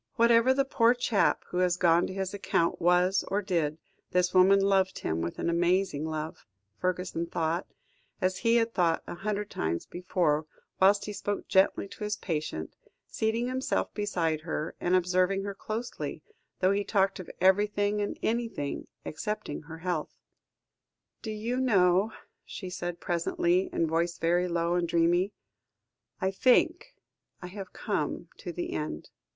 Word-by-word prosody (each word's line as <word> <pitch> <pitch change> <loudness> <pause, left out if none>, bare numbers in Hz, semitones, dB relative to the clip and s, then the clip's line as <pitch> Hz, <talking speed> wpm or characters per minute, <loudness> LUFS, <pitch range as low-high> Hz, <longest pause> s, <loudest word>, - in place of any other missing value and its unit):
"Whatever 235 +1 +5
the 275 +1 +2
poor 245 -3 +3
chap 240 -4 +1
who 180 - -4
has 180 -1 +2
gone 170 -1 +4
to - - -6
his 190 0 -3
account 170 -4 0
was 180 +2 +3
or 195 +2 0
did, 165 -6 0 0.3
this 180 0 +1
woman 190 +2 +6
loved 195 -1 +2
him 80 +1 -2
with 85 +1 -4
an - - -2
amazing 175 -2 +1
love," 155 -3 -5 0.3
Fergusson 180 -2 -1
thought, 165 +2 -1 0.5
as 185 0 0
he 230 0 +3
had 230 -1 +2
thought 170 -3 +1
a - - -6
hundred 205 +3 -3
times 80 +1 -2
before, 170 -4 0 0.3
whilst 200 +2 +4
he 210 - -5
spoke 205 0 -3
gently 190 +1 +3
to 200 - -9
his 210 0 -2
patient, 150 - -4 0.3
seating 225 +2 -1
himself 255 +1 -1
beside 170 -7 -1
her, 160 -1 -3
and 180 +1 +2
observing 185 +2 +2
her 200 0 -4
closely, 220 +4 -5 0.4
though 185 +1 +4
he 200 +1 +1
talked 195 -2 +1
of 185 - -8
everything 205 +2 +3
and 205 - -3
anything 225 -11 -2 0.2
excepting 210 -2 -4
her 160 +1 -10
health. 170 -2 -3 1.0
"Do 225 - -6
you 220 +3 -2
know," 200 -5 +3 0.3
she 185 -3 -7
said 175 -1 -4
presently, 175 +1 +1
her 165 - +1
voice 170 +2 0
very 175 +2 +2
low 170 0 0
and 175 -1 +1
dreamy. 170 +3 +2 0.9
"I 190 0 0
think 255 - +2 0.4
I - - -8
have 195 0 -8
come - - -3
to 180 - -6
the 175 +1 -4
end." 150 - -4
185 Hz, 155 wpm, -29 LUFS, 170-205 Hz, 1.0 s, woman